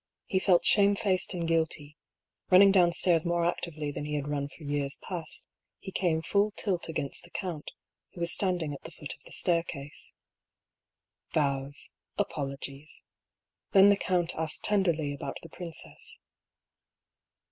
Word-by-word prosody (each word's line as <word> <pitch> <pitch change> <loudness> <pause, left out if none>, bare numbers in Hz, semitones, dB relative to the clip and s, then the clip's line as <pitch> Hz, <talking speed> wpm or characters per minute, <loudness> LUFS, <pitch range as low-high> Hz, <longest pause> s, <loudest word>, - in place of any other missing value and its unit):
He 190 - +1
felt 185 -2 +4
shamefaced 200 -2 +3
and 170 -2 -2
guilty: 160 -3 0 0.5
running 195 +1 +8
down 180 -3 +5
stairs 170 -1 +3
more 170 -1 +1
actively 155 -3 -2
than 145 - -5
he 150 0 -2
had 145 -1 -2
run 145 -1 -2
for 155 - -14
years 145 -1 -1
past, 170 -4 -6 0.3
he 190 - -8
came 165 -4 +1
full 200 +7 +2
tilt 185 -6 -1
against 150 -4 -3
the - - -14
count, 170 -6 -4 0.4
who - - -11
was 170 0 +3
standing 175 -6 0
at 140 - -8
the - - -9
foot - - -7
of - - -18
the - - -12
staircase. 165 -4 -2 1.2
Bows, 140 -1 -1 0.3
apologies. 140 +1 -4 0.7
Then 195 +1 +8
the 200 - +6
count 180 -3 0
asked 160 -1 -2
tenderly 170 -8 +1
about 140 -1 -5
the 165 - -10
princess. 170 -3 -5
165 Hz, 145 wpm, -29 LUFS, 145-185 Hz, 1.2 s, running